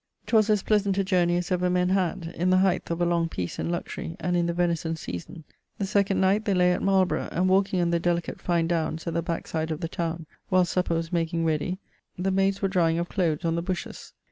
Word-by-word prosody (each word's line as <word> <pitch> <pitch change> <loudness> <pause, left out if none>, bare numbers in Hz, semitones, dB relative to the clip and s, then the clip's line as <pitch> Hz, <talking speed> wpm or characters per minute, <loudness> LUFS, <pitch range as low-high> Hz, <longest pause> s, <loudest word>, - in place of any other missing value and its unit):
'Twas 220 -2 +3
as 210 -2 +2
pleasant 205 -2 +1
a 195 - +2
journey 175 -2 +2
as 175 +1 -3
ever 180 0 +1
men 180 0 +2
had; 180 -2 -1
in 180 +2 0
the 185 - +5
heighth 185 -1 +1
of 170 0 -2
a - - +3
long 170 -1 +1
peace 90 - -4
and - - -2
luxury, 170 -1 -4
and 180 0 -1
in 170 -1 +1
the - - +1
venison 170 -2 0
season. 160 - -7 0.3
The 200 - -1
second 200 0 +1
night 195 +3 +3
they 200 -3 +1
lay 180 0 +4
at - - -2
Marlborough, 190 -2 +1
and 180 +2 +1
walking 190 0 +2
on 170 0 +1
the 170 - +2
delicate 170 0 -1
fine 170 -2 +1
downes 165 -1 -1
at 170 - -3
the 170 - 0
backside 165 -1 -3
of 155 - -3
the 165 - -3
towne, 165 0 -3 0.2
whilest 185 -2 +3
supper 180 -2 +1
was 165 +1 -3
making 165 0 0
ready, 160 +3 0 0.4
the 190 +2 0
maydes 195 +1 +1
were - - +4
drying 170 -4 +2
of 170 +1 -2
cloathes 170 -4 0
on 165 - +1
the 170 - -1
bushes. 180 +1 -5
175 Hz, 240 wpm, -26 LUFS, 165-190 Hz, 0.4 s, the